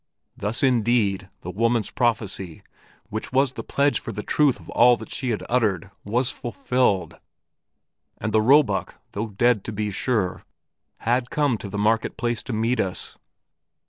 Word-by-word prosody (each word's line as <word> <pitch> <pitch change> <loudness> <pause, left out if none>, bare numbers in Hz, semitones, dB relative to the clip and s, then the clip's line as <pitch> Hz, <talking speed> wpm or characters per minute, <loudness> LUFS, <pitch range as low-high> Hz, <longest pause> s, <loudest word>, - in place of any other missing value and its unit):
Thus 110 +8 -3
indeed 115 -6 +2
the 90 - -6
woman's 115 +2 +1
prophecy, 105 -7 -1 0.5
which 110 0 -4
was 135 0 +3
the - - -6
pledge 140 +1 +1
for - - -6
the 105 0 -5
truth 145 -4 +2
of - - -15
all 120 +1 +6
that - - -10
she 130 - -2
had 110 - -1
uttered, 100 -7 0
was 120 +5 0
fulfilled, 125 -5 -1 1.0
and 110 - -3
the 110 0 +4
roebuck, 125 -4 +3 0.2
although 110 +2 -2
dead 110 +1 +2
to - - -4
be 105 0 -2
sure, 100 -2 -1 0.6
had 120 +2 +1
come 145 -5 +1
to 100 - -7
the 100 - -5
market 110 +2 +1
place 120 -1 -1
to - - -7
meet 115 +3 0
us. 95 -2 -1
115 Hz, 160 wpm, -24 LUFS, 105-125 Hz, 1.0 s, all